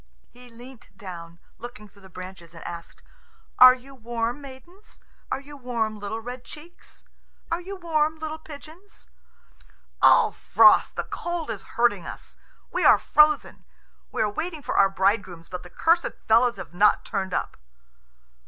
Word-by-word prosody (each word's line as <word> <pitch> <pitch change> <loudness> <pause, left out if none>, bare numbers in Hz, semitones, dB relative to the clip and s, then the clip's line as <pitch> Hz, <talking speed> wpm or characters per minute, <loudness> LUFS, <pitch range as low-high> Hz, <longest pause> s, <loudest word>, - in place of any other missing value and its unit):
He 245 0 -16
leant 240 +2 -14
down, 170 -5 -9 0.2
looking 230 -3 -10
through 200 0 -22
the 190 - -15
branches, 185 -2 -11
and 165 - -11
asked, 170 -1 -9 0.6
"Are 255 0 +10
you 265 +2 -15
warm, 235 +1 -3
maidens? 340 +10 -14 0.3
Are - - -1
you 290 +1 -13
warm, 230 -5 -3
little 205 +2 -4
red 245 +2 -8
cheeks? 330 +3 -14 0.5
Are 335 +1 -1
you 390 +3 -7
warm, 315 -3 0
little 315 0 -6
pigeons?" 315 +6 -14 0.9
"Ugh, - - +6
Frost, - - +5
the - - -2
cold 345 -2 -4
is - - -6 0.2
hurting 205 -7 +2
us. - - -10 0.3
We - - -1
are - - +7
frozen. 300 -1 +2 0.5
We - - 0
are 210 - 0
waiting 315 - -5
for - - -3
our 195 - +5
bridegrooms, 190 -3 -1
but 180 -1 -6
the 180 - -13
cursed 335 - +1
fellows 235 +2 +4
have 165 -1 -10
not 205 +4 +3
turned 190 -4 -3
up." - - -3
240 Hz, 155 wpm, -25 LUFS, 200-305 Hz, 0.9 s, Are